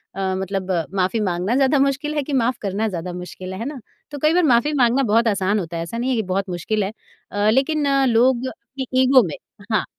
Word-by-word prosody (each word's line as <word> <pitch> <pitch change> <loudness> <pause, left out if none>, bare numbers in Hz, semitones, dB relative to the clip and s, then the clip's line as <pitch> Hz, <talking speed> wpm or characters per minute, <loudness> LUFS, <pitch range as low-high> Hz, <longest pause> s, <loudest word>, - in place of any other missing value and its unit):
अ, 190 -1 -1
मतलब 190 0 -3 0.2
माफ़ी 190 +4 +1
माँगना 185 +2 0
ज़्यादा 275 +1 +3
मुश्किल 275 +2 0
है 295 - 0
कि 285 - -5
माफ़ 250 -1 +1
करना 205 +2 -1
ज़्यादा 180 -3 -4
मुश्किल 185 +1 -7
है। 190 - -7
है 230 - -4
ना? 285 0 -5 0.3
तो 290 - -6
कई 305 +3 +3
बार 360 +1 +3
माफ़ी 285 +1 +3
माँगना 260 -1 +3
बहुत 230 +1 +2
आसान 200 0 +1
होता 170 -2 -5
है 165 - -2
ऐसा 170 +8 -6
नहीं 245 +2 -1
है 260 - +1
कि 220 - 0
बहुत 195 0 -1
मुश्किल 200 +5 -1
है 195 - -3 0.4
अ, 205 +1 +1
लेकिन 285 +5 +2
अ, 275 -1 +3
लोग 250 +1 +3
अपनी 265 0 -8
ईगो 260 -1 +6
में 150 - -5 0.4
हाँ। 215 - +1
230 Hz, 235 wpm, -21 LUFS, 190-270 Hz, 0.4 s, ईगो